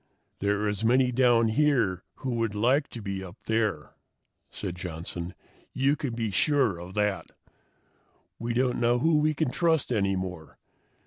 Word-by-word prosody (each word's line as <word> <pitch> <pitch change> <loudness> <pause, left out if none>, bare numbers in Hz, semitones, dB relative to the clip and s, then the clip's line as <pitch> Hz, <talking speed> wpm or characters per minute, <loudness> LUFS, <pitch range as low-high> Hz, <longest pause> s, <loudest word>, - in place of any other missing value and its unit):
"There 100 +1 0
are 105 - 0
as 105 +1 -2
many 125 +2 +4
down 120 -2 +4
here 115 - +2
who 130 - -4
would 115 -3 -1
like 130 +7 +2
to 115 - -9
be 100 -1 -4
up 95 +3 -10
there," 110 -8 -1 0.6
said 90 - -5
Johnson. 85 0 -6 0.4
"You 135 +2 +2
can 135 -6 -4
be 115 -3 -2
sure 130 - +2
of 90 +2 -9
that. 105 -1 0 1.1
We 115 0 -2
don't 125 0 +1
know 120 +1 +3
who 155 +4 +3
we 155 0 +2
can 140 -3 0
trust 160 -4 +1
any 100 -3 +1
more. 90 -4 -6
115 Hz, 165 wpm, -27 LUFS, 95-130 Hz, 1.1 s, many